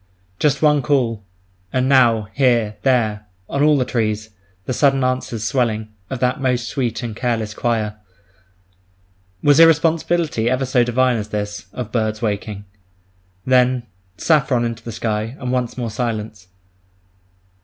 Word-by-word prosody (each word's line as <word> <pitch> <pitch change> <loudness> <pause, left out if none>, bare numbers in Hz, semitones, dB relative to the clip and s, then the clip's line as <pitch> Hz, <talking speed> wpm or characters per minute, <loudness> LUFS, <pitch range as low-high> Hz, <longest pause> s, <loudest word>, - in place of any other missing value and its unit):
Just 150 0 +1
one 150 -1 +4
call—and 100 -4 -2
now, 120 -6 +4
here, 120 -6 +2
there, 110 -5 +1 0.2
on 140 - -2
all 150 0 +5
the 130 - +1
trees, 110 -3 -2 0.3
the - - -2
sudden 135 0 +2
answers 125 -3 -2
swelling, 110 -3 0 0.2
of 130 - -4
that 125 +3 0
most 125 -2 0
sweet 125 -3 -2
and 115 -3 -5
careless 115 -3 -2
choir. 110 -3 -1 1.5
Was 145 +1 +5
irresponsibility 165 -5 +3
ever 130 +1 0
so 125 -1 +2
divine 125 +1 +2
as 105 -1 -5
this, 105 -3 -4
of 120 -3 -6
birds 110 -2 -1
waking? 105 -2 -3 0.8
Then—saffron 125 - +1
into 115 -1 -5
the 115 - -6
sky, 110 +1 -3
and 125 -2 -3
once 125 -1 -2
more 120 -3 -3
silence! 110 -5 -4
120 Hz, 135 wpm, -20 LUFS, 110-130 Hz, 1.5 s, all